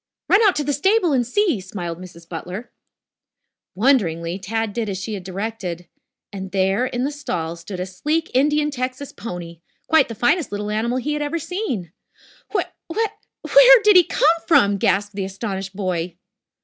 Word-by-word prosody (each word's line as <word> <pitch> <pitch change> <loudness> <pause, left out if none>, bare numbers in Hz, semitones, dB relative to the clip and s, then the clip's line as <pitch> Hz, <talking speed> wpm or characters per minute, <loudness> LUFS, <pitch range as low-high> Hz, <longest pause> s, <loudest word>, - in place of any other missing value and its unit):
"Run 400 - +5
out 410 -4 +4
to 295 - 0
the 290 0 -1
stable 380 +1 +2
and 245 -3 +1
see," 340 - +1
smiled 175 -3 -6
Mrs. 170 -2 -12
Butler. 180 +7 -7 1.0
Wonderingly, 185 -7 +1
Tad 220 +2 -2
did 225 -2 -2
as 190 - -3
she 205 +4 -5
had 195 -3 -5
directed. 185 -2 -5 0.5
And 190 -1 -6
there 195 +5 +1
in 245 +1 -2
a 285 - -1
stall 170 - -4
stood 180 +2 -8
a 180 - -2
sleek 300 - -2
Indian 295 +3 +2
Texas 255 +1 -4
pony, 170 -6 -7 0.3
quite 320 -4 +4
the 230 - -7
finest 270 - +1
little 205 +1 -3
animal 230 +4 0
he 290 +4 -2
had 295 - -2
ever 295 +3 -1
seen. 315 - -4 0.6
"Wh - - +1 0.3
whe 445 +7 0 0.4
where - - +8
did 420 -1 +6
he 360 - +9
come 325 +1 +2
from!" 205 -11 +4
gasped 200 +2 +1
the 195 0 -3
astonished 195 0 -5
boy. 180 -3 -2
220 Hz, 175 wpm, -21 LUFS, 185-295 Hz, 1.0 s, he